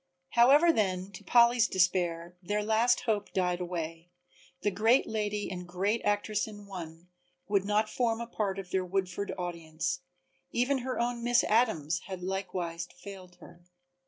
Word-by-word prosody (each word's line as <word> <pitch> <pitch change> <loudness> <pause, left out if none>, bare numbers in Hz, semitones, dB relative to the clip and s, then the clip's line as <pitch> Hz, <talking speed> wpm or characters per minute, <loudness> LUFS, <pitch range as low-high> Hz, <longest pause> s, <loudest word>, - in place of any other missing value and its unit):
However 285 +8 +6
then, 190 -4 -1
to 185 - -11
Polly's 235 -1 +5
despair, 175 -2 0
their 205 +3 -1
last 225 +3 +3
hope 215 -4 -1
died 180 -1 0
away 165 -1 -5 0.5
the 205 - +1
great 225 +7 +3
lady 210 -1 -2
and 180 -1 -5
the - - -10
great 195 +6 -1
actress 205 +1 0
in 205 -1 -10
one 175 -3 -9 0.4
would 200 -2 +1
not 210 +1 +2
form 230 0 0
a 235 - -3
part 210 -4 -2
of 185 -2 -7
their 190 -1 +1
Woodford 190 +1 -2
audience, 165 -3 -3 0.5
even 260 +3 +1
her 255 +1 -3
own 235 0 -1
Miss 240 0 +4
Adams 210 -9 +2
had 185 -2 -6
likewise 180 -3 -3
failed 185 -2 -11
her. 175 - -14
195 Hz, 160 wpm, -30 LUFS, 180-225 Hz, 0.5 s, However